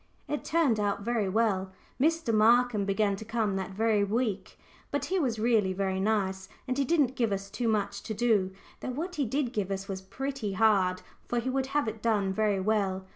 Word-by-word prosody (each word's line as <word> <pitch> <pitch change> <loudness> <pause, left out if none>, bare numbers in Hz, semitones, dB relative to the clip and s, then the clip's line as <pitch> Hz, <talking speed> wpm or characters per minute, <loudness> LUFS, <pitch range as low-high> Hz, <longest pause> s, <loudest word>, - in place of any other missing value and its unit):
It 295 - -3
turned 310 -9 +2
out 200 -1 -1
very 225 -3 0
well. 195 -3 +1 0.3
Mr. 325 -5 +2
Markham 225 -1 +4
began 200 0 +1
to 220 - -7
come 215 -2 -1
that 190 -1 -3
very 210 +1 +1
week, 210 -1 -2 0.3
but - - -1
he 380 0 0
was 250 -8 0
really 215 -4 +2
very 190 0 -1
nice, 190 -2 0 0.2
and 255 - 0
he - - +3
didn't 275 -4 +2
give 230 -4 +1
us 195 0 -3
too 240 - -2
much 200 -2 0
to 220 - -5
do, 210 -4 +2 0.3
though - - -5
what 330 +7 -4
he 285 - +1
did 260 +1 -1
give 205 -5 -1
was 195 -1 -4
pretty 260 +1 -4
hard, 190 -3 +3 0.2
for 240 - -1
he 255 +2 -2
would 265 0 0
have 290 - +1
it 220 0 -4
done 205 -4 +1
very 210 -1 +1
well. 190 -2 0
215 Hz, 200 wpm, -29 LUFS, 195-245 Hz, 0.3 s, Markham